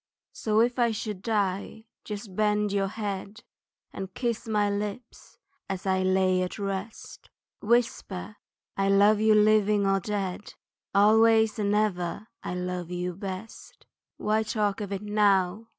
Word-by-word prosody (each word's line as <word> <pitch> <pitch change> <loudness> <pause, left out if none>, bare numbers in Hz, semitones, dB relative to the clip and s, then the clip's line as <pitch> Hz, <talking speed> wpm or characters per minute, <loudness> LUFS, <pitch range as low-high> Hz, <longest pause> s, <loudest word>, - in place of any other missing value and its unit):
So, 215 0 +1
if 245 +2 +1
I 240 -1 +4
should 210 -3 -4
die 205 0 -2 0.2
just 205 -2 -7
bend 210 0 +1
your 195 -1 +1
head, 205 0 -5 0.5
And 190 -1 -6
kiss 235 -3 -2
my 210 -2 +1
lips 205 +3 -5 0.3
as 190 -1 -4
I 190 -1 +1
lie 185 0 +2
at 180 - -3
rest, 200 +1 -6 0.3
Whisper, 215 -3 -1 0.4
I 195 0 +1
love 205 +2 +5
you 215 0 +4
living 210 -1 +4
or 195 0 +2
dead 200 0 -4 0.4
Always 220 +2 +5
and 205 0 +1
ever 205 -1 -1
I 180 - -4
love 180 -1 -4
you 180 0 -3
best. 195 +3 -8 0.3
Why 215 +1 +1
talk 210 -1 -1
of 200 -1 -5
it 200 +1 -4
now? 205 0 +2
205 Hz, 140 wpm, -27 LUFS, 190-215 Hz, 0.5 s, love